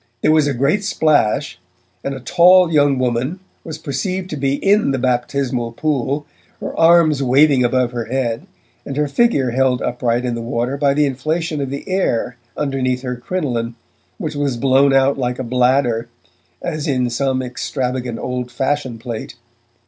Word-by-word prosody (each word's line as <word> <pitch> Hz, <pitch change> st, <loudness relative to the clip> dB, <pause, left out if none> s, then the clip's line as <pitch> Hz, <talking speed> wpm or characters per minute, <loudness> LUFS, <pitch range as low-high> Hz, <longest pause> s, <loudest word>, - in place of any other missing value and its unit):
There 155 Hz, -, +4 dB
was 155 Hz, -2 st, +4 dB
a 140 Hz, -, -1 dB
great 140 Hz, -, +1 dB
splash, 145 Hz, -, +1 dB, 0.4 s
and 140 Hz, -, -3 dB
a -, -, -7 dB
tall 175 Hz, +5 st, +5 dB
young 145 Hz, -2 st, +4 dB
woman 130 Hz, +7 st, -1 dB, 0.2 s
was 160 Hz, -1 st, -7 dB
perceived 180 Hz, +5 st, -3 dB
to -, -, -2 dB
be 135 Hz, -1 st, 0 dB
in 200 Hz, +5 st, +2 dB
the 135 Hz, -, 0 dB
baptismal 125 Hz, -1 st, -1 dB
pool, 145 Hz, +1 st, -1 dB, 0.3 s
her -, -, -5 dB
arms 165 Hz, -3 st, +5 dB
waving 135 Hz, +1 st, +4 dB
above 125 Hz, 0 st, +1 dB
her 120 Hz, -2 st, -4 dB
head, 120 Hz, -2 st, -2 dB, 0.4 s
and 135 Hz, -, -6 dB
her 150 Hz, 0 st, +1 dB
figure 140 Hz, -, +2 dB
held 130 Hz, 0 st, +2 dB
upright 120 Hz, 0 st, -1 dB
in 125 Hz, -, -1 dB
the 115 Hz, -, -4 dB
water 120 Hz, +3 st, -2 dB
by 140 Hz, -1 st, +1 dB
the 150 Hz, 0 st, +3 dB
inflation 155 Hz, +3 st, -2 dB
of 135 Hz, -, -3 dB
the 140 Hz, +1 st, -6 dB
air 185 Hz, -, 0 dB, 0.2 s
underneath 130 Hz, -3 st, -1 dB
her 125 Hz, -1 st, -3 dB
crinoline 120 Hz, -5 st, -3 dB, 0.4 s
which -, -, -4 dB
was 140 Hz, -4 st, -1 dB
blown 135 Hz, +2 st, +4 dB
out 135 Hz, +1 st, +3 dB
like 125 Hz, -1 st, -1 dB
a -, -, -3 dB
bladder, 125 Hz, -1 st, +1 dB, 0.5 s
as 155 Hz, -2 st, -3 dB
in 125 Hz, -4 st, 0 dB
some 130 Hz, +1 st, 0 dB
extravagant 125 Hz, -1 st, -3 dB
old 125 Hz, -1 st, -4 dB
fashion 135 Hz, -3 st, -2 dB
plate. 115 Hz, +1 st, -6 dB
135 Hz, 165 wpm, -19 LUFS, 125-150 Hz, 0.5 s, tall